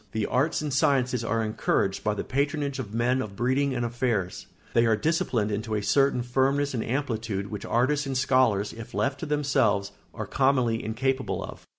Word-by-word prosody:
The 110 -2 0
arts 150 +5 +1
and 145 -3 -2
sciences 130 -3 +2
are 115 0 0
encouraged 110 -2 0
by 105 - 0
the - - -3
patronage 140 0 -1
of 110 -6 -5
men 120 +3 +1
of 100 -5 -6
breeding 130 +4 +1
and 120 -1 -1
affairs; 115 -6 -2 0.3
they 115 0 +4
are 110 - +4
disciplined 120 -6 0
into 110 +1 -2
a 105 - -1
certain 135 0 +2
firmness 135 +3 +1
and 115 - -1
amplitude 115 -6 -2
which 105 -2 -5
artists 140 +4 +1
and 135 -1 -1
scholars, 125 -6 +2
if 115 +1 -9
left 135 +1 0
to 160 - -5
themselves, 135 -9 +1 0.2
are - - -5
commonly 130 -4 +1
incapable 130 +4 -1
of. - - -10
125 Hz, 185 wpm, -26 LUFS, 110-135 Hz, 0.3 s, they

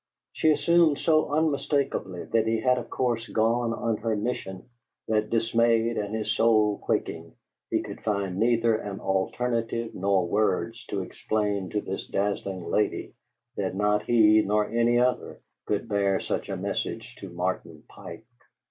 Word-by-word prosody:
She 160 - +2
assumed 165 -1 +4
so 155 0 +2
unmistakably 140 - 0
that 110 -1 +1
he 115 0 +1
had 125 0 +3
of - - -8
course 120 -3 -1
gone 115 +2 +1
on 115 -1 -1
her 110 0 -1
mission 105 -4 -4 0.4
that, 110 -1 +1
dismayed 115 0 +2
and 105 +1 -3
his 110 -1 -1
soul 110 -2 +3
quaking, - - -3 0.3
he - - 0
could - - -8
find 100 -3 -1
neither 115 0 +3
an 100 -2 -5
alternative 115 +4 -1
nor 95 -2 +1
words 105 +4 0
to 100 -2 -2
explain 100 -1 -2
to 105 - -1
this 95 - -5
dazzling 100 -2 -2
lady 105 - -1 0.4
that - - -2
not 105 +1 +2
he 110 -1 +5
nor 105 0 +1
any 120 +1 +2
other 125 0 0 0.3
could 105 +2 -1
bear 100 -2 +1
such - - -3
a - - -3
message - - -4
to - - -8
Martin - - -4
Pike. - - -11
110 Hz, 150 wpm, -26 LUFS, 100-115 Hz, 0.4 s, he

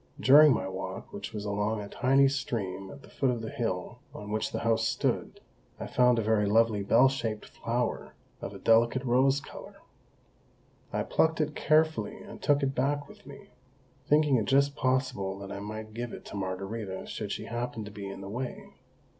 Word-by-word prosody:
During 150 +3 +8
my 95 -6 0
walk, 95 0 -6
which - - -6
was 105 -2 -5
along 105 +2 -1
a 105 - -6
tiny 135 +5 +3
stream 100 -9 -3
at 140 -1 -12
the - - -15
foot 135 - 0
of 120 -2 -1
the 110 - -5
hill 115 0 -3 0.2
on 105 0 -7
which 110 0 -1
the - - -3
house 115 -1 +2
stood, - - -1 0.4
I - - -4
found 125 -1 +3
a 115 - +1
very 105 -1 +2
lovely 110 0 +3
bell 125 +6 +5
shaped 115 -5 -3
flower 120 0 -3 0.3
of - - -5
a 100 - -9
delicate 115 +5 +3
rose 135 +2 +3
colour. - - -11 1.2
I - - -1
plucked 160 0 +1
it 150 -1 0
carefully 160 +7 +2
and 205 0 -11
took 145 -1 +2
it 135 0 0
back 145 +2 0
with 210 -1 -16
me, 200 - -12 0.6
thinking 150 -3 +4
it 110 - 0
just 140 +1 +3
possible 130 -9 0
that 100 0 -8
I 100 - -5
might 110 +1 -7
give 120 +1 -5
it - - -9
to - - -9
Margarita 95 +1 -4
should - - -5
she - - -4
happen 120 -2 -4
to 105 - -9
be 100 -1 -7
in 95 0 -8
the 100 - -7
way. 125 +4 -6
115 Hz, 195 wpm, -29 LUFS, 105-135 Hz, 1.2 s, During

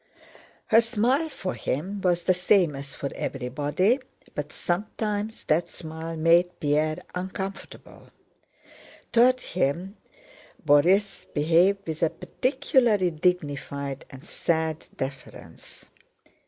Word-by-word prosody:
Her 225 +1 +7
smile 245 +7 +1
for 190 -10 -4
him 190 +10 -3
was 175 -2 +1
the 185 - +4
same 180 -3 +3
as 140 +1 -7
for 140 - -4
everybody, 145 - 0 0.3
but 150 0 -4
sometimes 210 +3 -3
that 160 +3 +1
smile 160 0 -7
made 170 +2 +3
Pierre 155 +1 0
uncomfortable. 190 +2 -7 1.0
Toward 250 +2 +5
him 180 +5 -2 0.7
Borís 180 +7 +3
behaved 170 +6 +3
with 160 -1 -5
a 165 - +4
particularly 250 - +1
dignified 145 -5 -2
and 135 +4 -12
sad 160 -3 -1
deference. 135 0 -8
175 Hz, 100 wpm, -26 LUFS, 150-200 Hz, 1.0 s, Her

